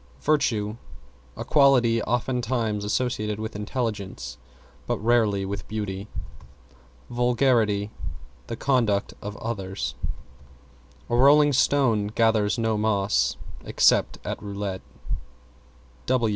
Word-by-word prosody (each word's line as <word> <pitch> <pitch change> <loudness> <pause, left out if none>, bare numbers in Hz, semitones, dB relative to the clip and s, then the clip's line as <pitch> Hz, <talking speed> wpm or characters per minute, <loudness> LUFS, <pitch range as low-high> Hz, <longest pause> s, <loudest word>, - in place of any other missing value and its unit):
=VIRTUE= 115 -8 +1 0.6
A - - -5
quality 125 -5 +4
oftentimes 120 -2 -1
associated 105 -1 -1
with 110 -1 -5
intelligence, 100 - -4 0.5
but - - 0
rarely 110 -3 +2
with 100 +1 -5
beauty. 105 -2 -4 1.0
=VULGARITY= 120 -4 +2 0.6
The - - -4
conduct 115 -6 +1
of 105 +1 -6
others. 95 - -4 1.1
A 120 - 0
rolling 145 +3 +6
stone 125 -6 +3
gathers 110 0 +2
no 110 -2 0
moss 105 -2 +1 0.3
except - - +3
at - - -4
roulette. 100 -2 -4
110 Hz, 90 wpm, -25 LUFS, 105-120 Hz, 1.1 s, rolling